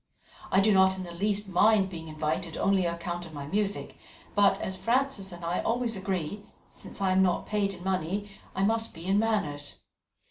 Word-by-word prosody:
I 190 - +5
do 210 +1 +4
not 190 0 +5
in 185 - -4
the 175 - -8
least 205 +3 -1
mind 195 +1 +4
being 165 -2 -7
invited 155 +1 -2
only 195 -3 +2
on 170 - -1
account 175 0 -5
of 160 - -12
my 140 -1 -5
music, 205 +6 -2 0.3
but, 205 -1 +4
as 190 - -3
Frances 235 -3 0
and 175 -1 -8
I 170 +2 0
always 235 0 0
agree, 190 0 -3 0.3
since - - -9
I 190 -1 +2
am 190 +1 +4
not 180 -2 +2
paid 205 -2 0
in 175 - -12
money, 190 +2 -1 0.3
I 190 - +1
must 225 +2 0
be 165 - -9
in 195 +2 +3
manners. 180 -11 -1
190 Hz, 200 wpm, -28 LUFS, 175-205 Hz, 0.3 s, I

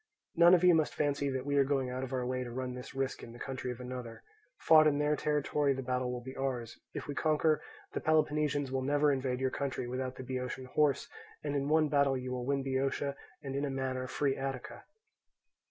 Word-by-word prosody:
None 170 +1 +8
of 180 - +1
you 180 -1 +7
must 160 -2 +2
fancy 145 -1 0
that 130 -1 -3
we 145 0 +1
are 140 - +6
going 135 -2 0
out 130 +1 -3
of 130 - -5
our 130 -2 -1
way 130 0 -1
to 120 - -6
run 125 +1 -4
this 125 +1 -9
risk 135 -1 -2
in 115 - -10
the 120 - -12
country 130 -1 -4
of 120 - -7
another. 125 -2 -7 0.3
Fought 155 -1 +6
in 145 -1 +3
their 150 +1 +2
territory 145 -1 +1
the 135 - -4
battle 125 0 -1
will 125 -1 -5
be 130 +1 -7
for 135 - -6
ours: 125 -4 -3 0.2
if - - -4
we 145 - -4
conquer, 155 +1 +2 0.3
the - - -2
Peloponnesians 150 -3 +1
will 130 0 0
never 145 +2 +3
invade 130 -2 -1
your 130 0 0
country 135 -3 -3
without 130 +1 -3
the - - -7
Boeotian 130 0 -4
horse, 140 +1 +1 0.4
and 145 -1 -2
in 140 0 0
one 155 0 +4
battle 140 -2 +3
you 125 0 -5
will 125 -1 -3
win 140 -1 +1
Boeotia 135 +1 -1 0.3
and 135 -1 -4
in 140 - -1
a 145 - 0
manner 130 -1 -2
free 135 +2 0
Attica. 135 -2 -5
135 Hz, 230 wpm, -32 LUFS, 130-145 Hz, 0.4 s, None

